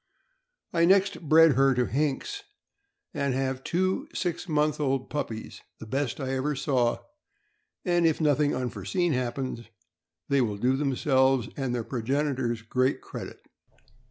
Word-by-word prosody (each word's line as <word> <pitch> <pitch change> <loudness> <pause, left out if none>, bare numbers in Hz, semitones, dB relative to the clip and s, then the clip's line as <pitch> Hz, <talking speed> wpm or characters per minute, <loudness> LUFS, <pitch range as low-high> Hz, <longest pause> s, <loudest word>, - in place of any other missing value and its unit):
I 170 -1 +4
next 195 +2 +3
bred 165 0 +7
her 135 0 +3
to 125 0 +2
Hinks, 150 - -2 0.7
and 140 -2 -1
have 130 0 -2
two 185 +2 0
six 180 -1 -3
month 150 -1 +1
old 135 -2 -1
puppies, 115 -7 -5 0.2
the - - -8
best 135 +2 -2
I 135 -2 -3
ever 135 +3 -1
saw, 130 -3 +1 0.9
and 175 -2 +3
if 160 - +1
nothing 150 -1 +2
unforeseen 165 - -1
happens, 125 -1 -3 0.6
they 140 -1 +3
will 105 -4 -1
do 125 +5 +2
themselves 135 -2 +2
and 130 -3 -2
their 120 - -2
progenitors 130 -1 -1
great 130 +4 +1
credit. - - -9
135 Hz, 135 wpm, -27 LUFS, 125-150 Hz, 0.9 s, bred